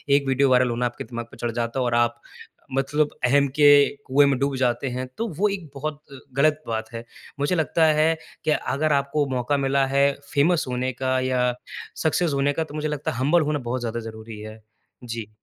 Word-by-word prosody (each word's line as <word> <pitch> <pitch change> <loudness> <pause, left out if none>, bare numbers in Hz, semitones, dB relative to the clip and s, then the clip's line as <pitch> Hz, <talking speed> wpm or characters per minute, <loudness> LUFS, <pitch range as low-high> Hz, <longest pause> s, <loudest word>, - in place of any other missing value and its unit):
एक 140 -1 +1
video 135 +1 +3
viral 125 -1 +4
होना 120 +1 -1
आपके 120 0 -4
दिमाग 120 -1 -6
पर - - -13
चढ़ 120 - -2
जाता 115 +2 -2
है 125 - +1
और 120 - 0
आप 120 0 +1 0.6
मतलब 145 +2 +1 0.2
अहम् 140 +3 +4
के 145 -1 +6 0.4
कुएँ 140 +2 +4
में 140 -2 +2
डूब 140 0 0
जाते 125 +1 0
हैं। 130 +1 -4
तो 230 - -1
वो 210 +1 +3
एक 190 -6 -5
बहुत 150 +1 -5 0.4
गलत 155 +2 +3
बात 110 -1 -3
है। 115 0 -6 0.4
मुझे 145 +6 +1
लगता 160 0 +2
है 160 +1 +3 0.3
कि 155 - +2
अगर 150 0 0
आपको 140 +1 +1
मौका 125 +4 0
मिला 135 0 +2
है 140 0 +5 0.2
फ़ेमस 160 +4 +3
होने 125 +1 -1
का 130 +1 0
या 125 -1 +1 0.5
सक्सेस 160 0 +1
होने 140 +1 +1
का, 160 - -1
तो 155 - -12
मुझे 155 0 -2
लगता 150 -1 -2
है - - -6
हम्बल 150 +7 +3
होना 150 -1 0
बहुत 130 +1 -1
ज़्यादा 120 0 -3
ज़रूरी 110 0 -10
है। 110 +1 -10 0.4
जी। 115 -3 -6
135 Hz, 210 wpm, -24 LUFS, 120-150 Hz, 0.6 s, के